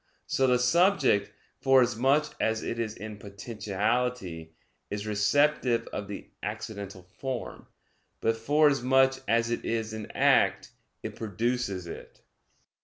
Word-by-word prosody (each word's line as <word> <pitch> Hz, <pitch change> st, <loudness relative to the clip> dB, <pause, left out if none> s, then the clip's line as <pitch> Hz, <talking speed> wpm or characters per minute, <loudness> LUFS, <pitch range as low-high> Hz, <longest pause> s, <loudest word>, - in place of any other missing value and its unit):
So 135 Hz, -, +1 dB
the 125 Hz, -1 st, +4 dB
subject, 125 Hz, -, +3 dB, 0.3 s
forasmuch 135 Hz, +3 st, +3 dB
as 110 Hz, 0 st, 0 dB
it 115 Hz, -, -3 dB
is 110 Hz, -1 st, -2 dB
in 110 Hz, 0 st, -8 dB
potentiality, 100 Hz, -3 st, -3 dB, 0.3 s
is 105 Hz, +1 st, -4 dB
receptive 115 Hz, +3 st, +2 dB
of 100 Hz, -, -4 dB
the 100 Hz, -, -8 dB
accidental 100 Hz, -2 st, -6 dB
form: 125 Hz, +7 st, -6 dB, 0.5 s
but 115 Hz, -, +1 dB
forasmuch 135 Hz, 0 st, +3 dB
as 115 Hz, 0 st, +2 dB
it 120 Hz, -, -2 dB
is 110 Hz, -1 st, -2 dB
in 110 Hz, -1 st, -6 dB
act, -, -, +2 dB, 0.3 s
it -, -, -5 dB
produces 110 Hz, -3 st, -2 dB
it. 85 Hz, -, -10 dB
115 Hz, 115 wpm, -28 LUFS, 105-125 Hz, 0.5 s, the